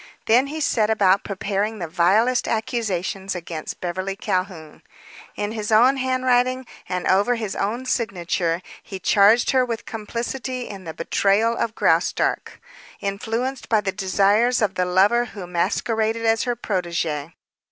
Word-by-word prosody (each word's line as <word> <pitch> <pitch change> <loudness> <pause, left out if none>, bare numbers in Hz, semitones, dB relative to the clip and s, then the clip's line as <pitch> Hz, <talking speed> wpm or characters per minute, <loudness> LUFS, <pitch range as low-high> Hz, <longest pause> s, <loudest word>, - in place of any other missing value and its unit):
Then 245 +5 +4
he 310 +3 -5
set 220 -7 +1
about 200 -3 +3
preparing 200 +2 -2
the 175 -4 -4
vilest 205 +10 +2
accusations 195 -4 -2
against 165 -2 -6
Beverly 185 +2 -3
Calhoun. 185 -6 -4 0.5
In 205 0 -3
his 215 -1 -4
own 245 +5 +5
handwriting 255 0 +1 0.2
and 180 0 -2
over 205 +6 +3
his 220 -4 -4
own 230 +6 -2
signature 180 -7 -1 0.2
he 195 - -8
charged 205 +5 +4
her 260 -1 +3
with 235 -3 -4
complicity 240 +3 -4
in 195 -3 -9
the 160 - -6
betrayal 200 +7 +1
of 225 -1 -2
Graustark, 165 +2 +1 0.4
influenced 225 +6 -3
by 220 - +4
the 195 -2 -2
desires 205 +5 +2
of 210 -3 +1
the 180 - 0
lover 200 +7 +3
who 205 -5 -8
masqueraded 220 +6 -1
as 225 +2 +2
her 245 -1 -1
protege. 170 -7 -3
210 Hz, 140 wpm, -22 LUFS, 185-235 Hz, 0.5 s, own